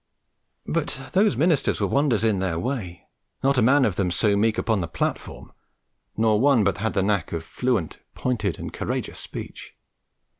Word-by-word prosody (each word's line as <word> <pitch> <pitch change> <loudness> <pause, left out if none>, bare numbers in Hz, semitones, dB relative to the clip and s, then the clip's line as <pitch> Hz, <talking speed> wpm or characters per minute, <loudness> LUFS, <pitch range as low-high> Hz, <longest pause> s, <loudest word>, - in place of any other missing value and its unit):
But 150 -3 -2
those 200 +2 +3
ministers 160 -3 +2
were - - +1
wonders 135 -7 +1
in 110 -4 +2
their 95 -3 -1
way; 95 -5 -4 0.4
not 135 -1 +3
a - - +3
man 135 +4 +5
of 100 -6 -1
them 95 -3 +1
so 100 +4 +2
meek 110 +2 +2
upon 110 -4 0
the 85 - -3
platform, 80 - -4 0.7
nor 110 -1 +3
one 135 -5 +4
but 100 -1 0
had 110 +2 -2
the 95 - +2
knack 100 -4 0
of 80 -1 -3
fluent, 120 -9 -2 0.2
pointed, 110 -7 -1
and - - -7
courageous - - -3
speech. - - -8
110 Hz, 175 wpm, -24 LUFS, 95-135 Hz, 0.7 s, man